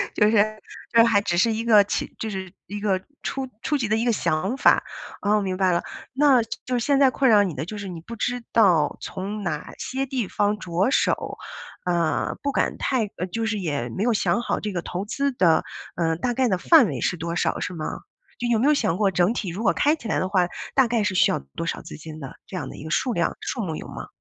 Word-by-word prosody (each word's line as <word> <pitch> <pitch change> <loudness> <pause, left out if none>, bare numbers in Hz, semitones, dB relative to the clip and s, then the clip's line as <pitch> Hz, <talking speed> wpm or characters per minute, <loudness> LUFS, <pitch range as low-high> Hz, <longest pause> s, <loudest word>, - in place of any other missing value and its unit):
就 210 -1 +4
是 - - +2 0.6
就 230 - +4
是 - - +9
还 205 -3 +4
只 175 -4 -1
是 225 +5 +4
一 225 - -2
个， 215 -3 +6
起 200 - -3
就 220 - -3
是 190 -3 -5 0.2
一 205 +1 -5
个 200 -3 +1 0.2
初 270 -1 -3
初 295 - 0
级 235 -5 -1
的 215 - +2
一 225 - 0
个 240 - +3
想 190 +3 0
法， - - +5 0.4
啊， 210 +1 +2
明 190 -2 -2
白 185 -1 +3
了。 170 - +1 0.3
那， 270 -2 +5
就 225 - -7 0.2
就 250 -1 0
是 230 - -2
现 280 -1 +3
在 270 -2 +6
困 265 0 +2
扰 210 -2 +6
你 180 -5 -2
的 155 - -4
就 210 +3 -7
是 200 -1 -6
你 170 -3 -7
不 230 +8 -8
知 245 +2 -2
道 175 -10 +4
从 200 +2 -5
哪 155 -4 -4
些 270 +1 -3
地 250 -5 -2
方 205 +2 0
着 185 +3 0
手， - - 0 0.5
呃， 170 -2 0
不 280 - -1
敢 - - 0
太 255 -4 +1
呃， 180 - -2
就 225 +5 -3
是 215 -1 -1
也 145 -9 -2
没 120 - -5
有 240 - +3
想 230 +2 +1
好 - - -1
这 210 - -4
个 175 -3 -2
投 185 +4 -4
资 280 +6 -1
的， 170 -9 +3 0.3
呃， 165 -1 +1
大 245 +9 -1
概 255 +1 +2
的 190 - +1
范 295 - +6
围 - - -4
是 - - +1
多 170 +1 -3
少 - - 0
是 180 - -3
吗？ 155 -2 -5 0.5
就 240 - -1
有 230 - +3
没 245 - +2
有 300 - +6
想 175 - +1
过 200 -2 +2
整 180 +4 +2
体 210 -6 -3
如 190 +6 -5
果 205 - +4
开 295 +2 +3
起 240 - -9
来 - - +1
的 185 - 0
话， 185 -2 +2 0.3
大 265 -3 +4
概 230 -2 +1
是 205 - 0
需 - - +5
要 - - 0 0.2
多 165 - -3
少 - - -3
资 - - -9
金 155 0 -9
的？ 135 -3 -8
这 185 - -6
样 145 -7 -4
的 - - -9
一 - - -9
个 155 - -7
数 245 +9 0
量、 170 -4 0
数 240 - -3
目 160 -5 -3
有 - - -8
吗？ - - -8
205 Hz, 280 characters per minute, -24 LUFS, 175-235 Hz, 0.6 s, 是